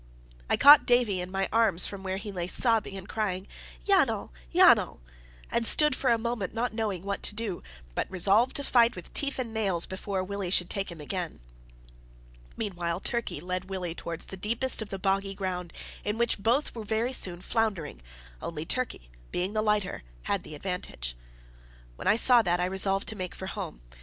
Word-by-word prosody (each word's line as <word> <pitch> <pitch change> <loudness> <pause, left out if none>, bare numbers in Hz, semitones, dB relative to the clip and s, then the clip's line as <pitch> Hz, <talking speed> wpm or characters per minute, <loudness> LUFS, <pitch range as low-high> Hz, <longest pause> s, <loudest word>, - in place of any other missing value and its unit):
I - - +3
caught 290 +1 +9
Davie 240 -7 +3
in 180 - -5
my 195 +1 -1
arms 220 -6 +4
from 200 -1 -5
where 190 0 -3
he 205 +1 -6
lay 175 -3 -3
sobbing 220 -1 +2
and 190 0 -9
crying 200 -4 -2 0.4
"Yanal! - - +2 0.2
Yanal!" - - +5 0.5
and 235 - +1
stood 300 +4 +5
for 260 - 0
a 235 - +4
moment 225 -4 -3
not 235 0 -1
knowing 210 -5 -2
what 200 0 -3
to 210 - -3
do, 210 -5 -3 0.3
but - - -2
resolved 200 +6 +3
to 285 - +3
fight 240 -3 +4
with 180 - -10
teeth 280 -1 0
and 240 -4 -3
nails 195 -6 +1
before 190 0 -3
Willie 200 -1 -4
should 175 -1 +1
take 195 -2 -2
him 170 - -10
again. 175 +3 -4 1.2
Meantime 175 -5 -2
Turkey 235 -10 -2
led 180 +3 -4
Willie 180 -3 -3
towards 170 0 -6
the 190 - -8
deepest 230 +6 0
of 215 - -6
the 195 - -4
boggy 195 +1 0
ground, 180 -3 -3 0.3
in 210 +1 -2
which 235 -2 0
both 240 +8 +1
were 225 - -6
very 225 +4 -1
soon 180 -8 +1
floundering, 190 - -2 0.4
only 160 -2 -5
Turkey, 250 - -2 0.2
being 185 +3 -2
the 215 - +1
lighter, 210 -3 0 0.2
had - - -1
the - - -9
advantage. - - -5 0.8
When - - -6
I - - +5
saw 240 +1 +7
that, 175 -4 0
I 180 - +1
resolved 195 +1 +1
to 220 - -4
make 185 -3 -5
for 190 - -7
home. 115 - -6
195 Hz, 185 wpm, -28 LUFS, 180-225 Hz, 1.2 s, caught